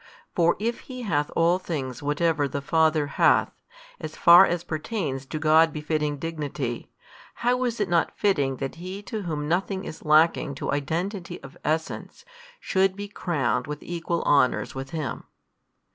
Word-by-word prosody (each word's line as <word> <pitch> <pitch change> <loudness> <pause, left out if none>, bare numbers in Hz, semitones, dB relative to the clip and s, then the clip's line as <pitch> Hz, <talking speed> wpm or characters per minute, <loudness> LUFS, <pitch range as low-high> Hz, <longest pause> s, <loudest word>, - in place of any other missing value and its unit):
For 170 -1 +3
if 230 +3 -2
He 255 -1 -6
hath 150 -9 0
all 170 +2 +3
things 135 -9 -4
whatever 150 0 +1
the 140 +1 -3
Father 155 +1 +2
hath, 145 - +3 0.5
as - - -7
far 175 +3 +8
as 175 0 -2
appertains 155 - -3
to 155 - -4
God 155 +1 +4
befitting 150 -1 -2
Dignity, 145 -6 -4 0.5
how 250 +1 +1
is 235 -2 -2
it 205 - +1
not 170 -2 +1
fitting 145 -10 +1
that 135 +4 -5
He 190 +3 -6
to 220 0 -5
Whom 155 -5 -3
nothing 190 +3 -1
is 155 - -8
lacking 155 -2 +3
to - - -3
Identity 170 +6 -3
of 135 +3 -11
essence 160 - -3 0.3
should 190 - +1
be 205 +1 -6
crowned 140 -11 -1
with 150 0 -6
equal 170 0 -3
honours 140 -4 +2
with 135 0 -6
Him? 155 -6 -4
160 Hz, 160 wpm, -25 LUFS, 145-185 Hz, 0.5 s, far